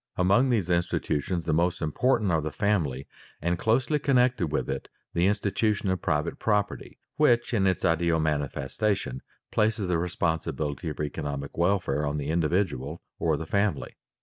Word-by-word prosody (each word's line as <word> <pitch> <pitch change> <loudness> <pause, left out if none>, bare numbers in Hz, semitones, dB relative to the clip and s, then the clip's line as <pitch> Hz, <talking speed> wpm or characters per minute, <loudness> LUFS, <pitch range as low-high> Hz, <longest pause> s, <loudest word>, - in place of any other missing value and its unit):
_ - - -66
Among 100 +9 +4
these 100 -8 +1
institutions 85 -1 0
the - - +1
most 85 +3 +1
important 105 - +1
are 80 -2 +2
the 80 - -2
family 80 - 0 0.3
and, 85 +2 -1
closely 130 +7 +2
connected 125 - +2
with 75 - -1
it, - - -4 0.3
the 85 +2 +3
institution 105 0 0
of 95 - -2
private 75 -4 -1
property 105 -2 -1 0.2
which, 120 -5 +3
in 100 -4 +3
its 95 - 0
ideal 85 0 +2
manifestation, 75 - -1 0.3
places 105 -2 +1
the 90 -2 +1
responsibility 80 -2 -2
for 75 - -4
economic 70 -1 -4
welfare 85 -5 +1
on 70 +1 -1
the 75 +1 -2
individual 85 -3 -1 0.2
or 80 -3 +1
the 80 - -5
family. 100 +3 0
85 Hz, 155 wpm, -27 LUFS, 75-105 Hz, 0.3 s, Among